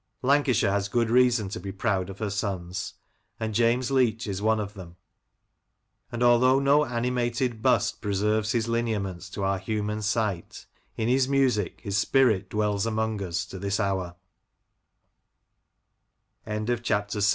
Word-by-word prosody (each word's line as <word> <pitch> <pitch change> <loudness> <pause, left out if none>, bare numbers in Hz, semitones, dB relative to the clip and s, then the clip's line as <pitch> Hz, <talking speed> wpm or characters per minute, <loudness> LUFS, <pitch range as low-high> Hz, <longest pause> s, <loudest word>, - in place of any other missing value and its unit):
Lancashire 130 -6 +3
has 100 0 0
good 115 0 +1
reason 120 -4 +4
to - - -5
be 100 - -6
proud 95 -1 -1
of 95 - -8
her 105 -2 -3
sons, 95 -3 -4 0.4
and 110 -1 -3
James 120 +4 +2
Leach 120 -4 +2
is 100 -2 -4
one 110 +1 +2
of 100 -1 -4
them, 90 -4 -11 1.2
and 120 +1 -2
although 125 +2 +5
no 140 +2 +4
animated 120 -1 -1
bust - - +1
preserves 105 +2 0
his 115 -1 0
lineaments 105 -6 -2
to 100 +2 -5
our 95 0 0
human 105 0 -3
sight, 105 -4 -2 0.3
in 110 - -1
his 130 +1 +2
music 130 -9 +1
his 100 0 -1
spirit 110 -7 +2
dwells 105 0 0
among 110 -1 -1
110 Hz, 125 wpm, -26 LUFS, 100-120 Hz, 1.2 s, although